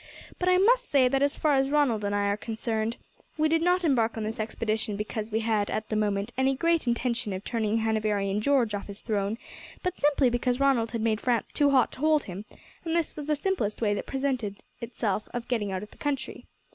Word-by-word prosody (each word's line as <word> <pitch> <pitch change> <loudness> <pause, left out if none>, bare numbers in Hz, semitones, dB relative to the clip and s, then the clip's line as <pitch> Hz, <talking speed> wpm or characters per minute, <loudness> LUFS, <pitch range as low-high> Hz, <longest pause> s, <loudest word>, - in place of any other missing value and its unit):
But 360 - +1
I 365 - +5
must - - +3
say, 270 -3 +5
that 270 +1 +1
as 285 0 +2
far 305 -2 +2
as 270 0 +2
Ronald 280 -8 +2
and 205 0 0
I 205 0 +1
are 200 0 +1
concerned, 220 +1 -3 0.4
we 310 0 +3
did 325 +1 +2
not 360 +1 +2
embark 235 -8 +2
on 220 - -2
this 220 +1 -4
expedition 215 -1 -2
because 210 +1 -4
we 220 +1 0
had 215 -2 0
at 215 - -3
the 215 - -1
moment 210 +1 0
any 265 +1 +2
great 335 0 +1
intention 235 -2 0
of 185 +1 -5
turning 220 -2 0
Hanoverian 210 -2 0
George 250 -4 +2
off 205 - -4
his 200 -1 -8
throne; 210 -1 -1 0.5
but 365 0 -2
simply 285 -3 +3
because 245 +1 0
Ronald 265 -5 +3
had 230 -1 -3
made 220 -1 +1
France 240 -3 0
too 290 -1 +3
hot 265 -3 +3
to - - -12
hold 310 0 +3
him, 195 +2 -7 0.4
and 330 -1 -1
this 335 -2 0
was 300 -1 -6
the 305 - +2
simplest 290 - -1
way 210 -3 +1
that 205 - -4
presented 255 -7 -2 0.2
itself 225 -3 -3
of 240 -1 -4
getting 215 -5 -1
out 190 +1 -3
of 210 - -11
the - - -18
country. 290 -2 -3
230 Hz, 225 wpm, -27 LUFS, 215-280 Hz, 0.5 s, I